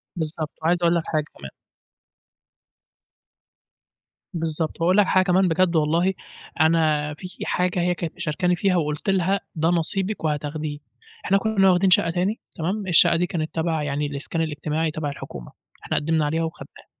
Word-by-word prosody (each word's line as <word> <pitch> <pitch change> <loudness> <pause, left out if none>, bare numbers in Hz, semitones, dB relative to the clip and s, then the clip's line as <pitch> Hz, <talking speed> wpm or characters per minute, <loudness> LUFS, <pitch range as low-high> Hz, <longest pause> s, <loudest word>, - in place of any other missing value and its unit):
بالضبط. 155 -2 -3
وعايز 175 +2 +1
أقول 170 0 +4
لك 170 - 0
حاجة 155 -1 0
كمان 70 -1 -9 2.8
بالضبط، 165 -1 -3
وأقول 180 +3 +3
لك 205 - +6
حاجة 185 - +4
كمان 185 +1 +3
بجد 175 +1 +2
والله 165 +5 +2 0.5
أنا 155 -2 +2
في 185 +5 -9 0.2
حاجة 180 0 0
هي 180 +1 +1
كانت 170 -2 -5
مشاركاني 175 +3 0
فيها 185 +1 +1
وقلت 150 +1 -1
لها 195 +1 +2 0.2
ده 160 +1 +1
نصيبك 185 +4 0
وهتاخديه، 150 0 -3 0.5
إحنا 195 - +3
كنّا 200 -2 +3
واخدين 185 +2 +3
شقّة 170 -2 +4
تاني 185 +6 -1 0.2
تمام 190 +5 -3
الشقّة 170 -1 +6
دي 175 +2 +1
كانت 160 -3 -4
تبع 160 -2 -1
يعني 145 0 -2
الإسكان 145 +3 -3
الإجتماعي، 155 +1 -2
تبع 155 -1 -3
الحكومة، 140 - -9 0.3
إحنا - - -1
قدّمنا 160 0 +1
عليها 160 +3 0
وخدناها، 160 - -8
165 Hz, 155 wpm, -23 LUFS, 155-180 Hz, 2.8 s, لك